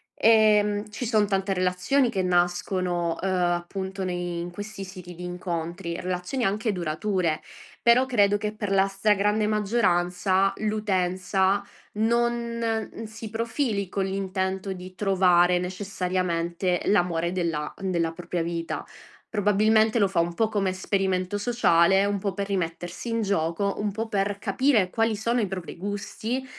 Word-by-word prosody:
Ehm, 210 -2 +4
ci 245 - -4
son 215 -3 +2
tante 195 0 0
relazioni 185 +9 +1
che 195 -5 0
nascono, 175 -1 0
uhm, 195 - -1
appunto 185 +2 -1
nei 175 -1 -3
in 175 +1 -5
questi 205 +2 -7
siti 180 -2 -10
di 180 - -9
incontri, 175 0 -4
relazioni 185 +7 -2
anche 210 +3 0
durature. 175 -1 -1 0.4
Però 240 +2 +5
credo 205 -5 +3
che 210 +1 -3
per 210 -2 -3
la 195 0 +4
stragrande 210 +1 +2
maggioranza 195 -3 +2
l'utenza 195 -2 0 0.3
non 235 0 -1
si 220 0 -8
profili 225 -3 -1
con 195 0 -1
l'intento 190 0 -2
di 185 0 -10
trovare 180 -3 +4
necessariamente 180 -2 -1
l'amore 175 -3 +2
della 165 -5 -2
della 175 -4 0
propria 175 0 -3
vita. 170 0 -3 0.5
Probabilmente 215 +2 +3
lo 200 -2 +3
fa 190 - 0
un 170 +1 +1
po' 220 +5 +1
come 200 -3 0
esperimento 185 0 -1
sociale, 195 -5 +3
un 200 0 0
po' 195 0 -2
per 200 0 -3
rimettersi 175 +1 -3
in 230 0 0
gioco, 195 0 0
un 205 0 -1
po' 225 +1 -3
per 200 0 0
capire 215 -1 +2
quali 225 +2 +1
sono 230 +4 0
i 210 - 0
propri 185 -3 -6
gusti, 205 +6 -4
195 Hz, 140 wpm, -26 LUFS, 180-210 Hz, 0.5 s, Però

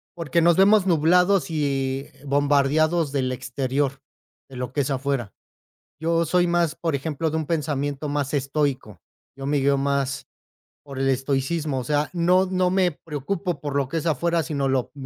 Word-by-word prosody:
porque 170 0 0
nos 170 0 +4
vemos 200 0 +5
nublados 180 +3 +3
y 135 -3 -1 0.2
bombardeados 145 +3 +2
del 130 -2 -1
exterior, 130 +2 -2 0.5
de 130 -2 -11
lo 125 0 -5
que 145 - +1
es 140 - -2
afuera. 135 -5 -2 0.7
Yo 165 +1 +1
soy 175 +2 +2
más, 170 -2 +1
por 165 -3 -2
ejemplo, 155 +2 -2
de 160 - -1
un 155 -2 -3
pensamiento 145 -2 -2
más 145 -1 -2
estoico. 140 -5 -2 0.3
Yo 135 0 -6
me 145 0 +1
guío 140 0 +2
más 140 -1 -1 0.6
por 135 -2 -8
el 135 - +1
estoicismo. 135 +2 -1
O - - -6
sea, 150 0 0
no 180 +2 +3
no 185 -1 +1
me 185 -2 +2
preocupo 165 +4 -4
por 145 -2 -4
lo 135 -2 0
que 165 - -4
es 160 - -5
afuera, 165 +2 +1
sino 140 -3 -2
lo 130 -2 -1
145 Hz, 170 wpm, -23 LUFS, 135-170 Hz, 0.7 s, vemos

